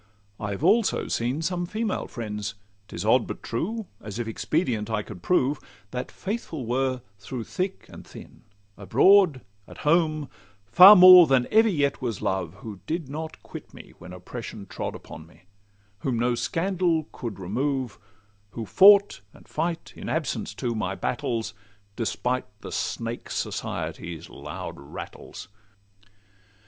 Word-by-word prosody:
I've 100 +4 -4
also 205 +4 +3
seen 125 +7 -1
some 175 +1 -2
female 215 +2 -2
friends 105 -3 -5 0.2
( 100 0 -39
'tis 90 - -6
odd, 115 +2 +3
But - - -7
true—as, 120 - -5
if 120 -2 -3
expedient, 115 - -1
I 110 -2 -1
could 95 -5 -10
prove) 145 - +1 0.3
That 125 0 -5
faithful 190 - -5
were 130 +1 -1 0.2
through 115 +4 -6
thick 185 - -4
and - - -12
thin, - - -13 0.4
abroad, 160 - +4 0.3
At - - -12
home, 155 -2 +2 0.4
far 185 - +10
more 180 -2 +10
than 130 -2 +3
ever 220 +1 +5
yet 145 -8 0
was 115 -5 -3
Love— 95 -4 -2
Who 105 -4 -8
did 160 -3 -3
not 160 +2 -7
quit - - -11
me - - -13
when 90 +1 -11
Oppression 100 +3 -8
trod - - -5
Upon 80 +1 -11
me; 85 - -22 0.6
whom 125 -1 -1
no 120 +1 +1
scandal 165 +3 0
could 115 -4 -6
remove; 125 +4 -2 0.5
Who 115 - -5
fought, 200 - +6
and - - -18
fight, 165 +1 -3
in - - -7
absence, 120 -10 -2
too, 120 0 -2
my 100 -4 -2
battles, 115 -4 -2 0.4
Despite 125 +3 -2
the - - -8
snake 115 +1 -4
Society's 85 -2 -5
loud - - -7
rattles. 70 - -9
125 Hz, 140 wpm, -25 LUFS, 110-170 Hz, 0.6 s, far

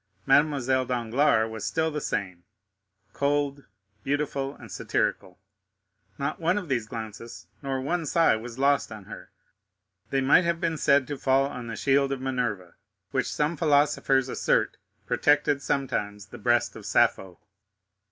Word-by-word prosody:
Mademoiselle 135 -2 +3
Danglars 120 -1 +1
was 110 -1 -6
still 160 0 0
the 150 -1 -3
same—cold, 105 +10 -4 0.4
beautiful, 140 -1 -2
and - - -13
satirical. 95 -2 -2 0.8
Not 140 - -3
one 175 +3 +1
of 190 -4 -4
these 120 -5 -1
glances, 110 0 -8 0.2
nor 135 -2 -2
one 165 +4 -2
sigh, 165 -4 +4
was 115 +2 -7
lost 140 -3 +2
on 110 -2 -8
her; - - -11 0.8
they 135 - +1
might 135 +7 +5
have 170 -1 0
been 165 -1 -1
said 140 -2 +3
to 145 -1 -6
fall 135 0 +3
on 125 -4 -6
the 115 - -5
shield 140 0 +2
of 135 - -2
Minerva, 120 -9 -3 0.4
which 130 - -1
some 150 +3 0
philosophers 145 -4 +2
assert - - 0 0.3
protected 145 -1 +2
sometimes 105 -9 -2
the 115 +4 -12
breast 120 +2 +1
of - - -10
Sappho. 95 -2 +1
135 Hz, 140 wpm, -26 LUFS, 115-145 Hz, 0.8 s, might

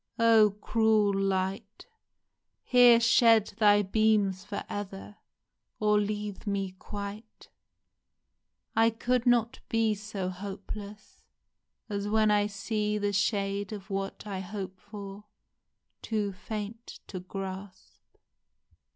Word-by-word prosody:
Oh, 225 -2 +6
cruel 220 -3 +3
Light! 195 +2 -2 0.8
Here 245 -2 +7
shed 230 -2 +4
thy 205 -1 +5
beams 205 -2 +2
for 205 - -5
ever, 205 0 -7 0.6
Or 210 -1 +3
leave 210 0 -4
me 195 -2 -1
quite! 205 +2 -8 1.3
I 225 0 +5
could 245 +2 -1
not 240 -2 +2
be 225 -1 +2
so 200 -2 -4
hopeless 200 +2 -8 0.7
As 205 -1 -3
when 215 0 +3
I 205 0 +3
see 210 +1 -2
the 205 -1 -1
shade 200 0 0
of 205 -1 -8
what 195 +1 -4
I 200 -3 -4
hope 190 0 -6
for 205 0 -9 0.8
Too 210 -3 -1
faint 215 +4 -7
to 185 - -7
grasp 190 +1 -9
205 Hz, 110 wpm, -29 LUFS, 195-220 Hz, 1.3 s, Here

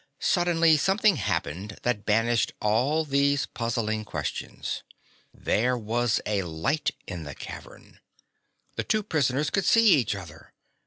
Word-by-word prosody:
Suddenly 170 -3 +3
something 195 +3 +3
happened 90 - -3
that 120 -4 -1
banished 115 +2 +2
all 130 +10 +1
these 140 0 +2
puzzling 110 -2 -2
questions. 75 -8 -4 0.5
There 125 +4 0
was 115 +1 0
a 105 -2 0
light 95 - -1 0.2
in 90 -3 -6
the 75 -3 -8
cavern! - - -11 0.8
The - - 0
two 215 -1 0
prisoners 145 -4 0
could 195 - +1
see 230 -1 +5
each 125 - +3
other! 80 -5 -11
120 Hz, 125 wpm, -26 LUFS, 105-155 Hz, 0.8 s, see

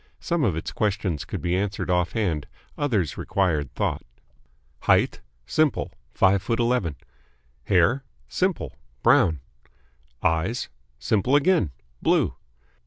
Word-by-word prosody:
Some 170 -3 0
of 100 -10 +2
its 80 - -4
questions 100 - -1
could - - -5
be 85 +1 +1
answered 95 -2 -1
off 90 -1 +1
hand, 90 -10 -1 0.3
others 110 - 0
required 80 -9 0
thought. - - -1 0.8
"Height?" - - +2 0.2
Simple. 155 - +1 0.2
Five 95 0 +3
foot 115 +3 -1
eleven. 115 - +1 0.7
"Hair?" 100 +9 +3 0.2
Simple. - - -1 0.3
Brown. 80 -5 +4 0.8
"Eyes?" 80 +9 0 0.3
Simple 105 - +1
again. 145 - +3 0.3
Blue. - - +2
95 Hz, 110 wpm, -25 LUFS, 85-115 Hz, 0.8 s, Brown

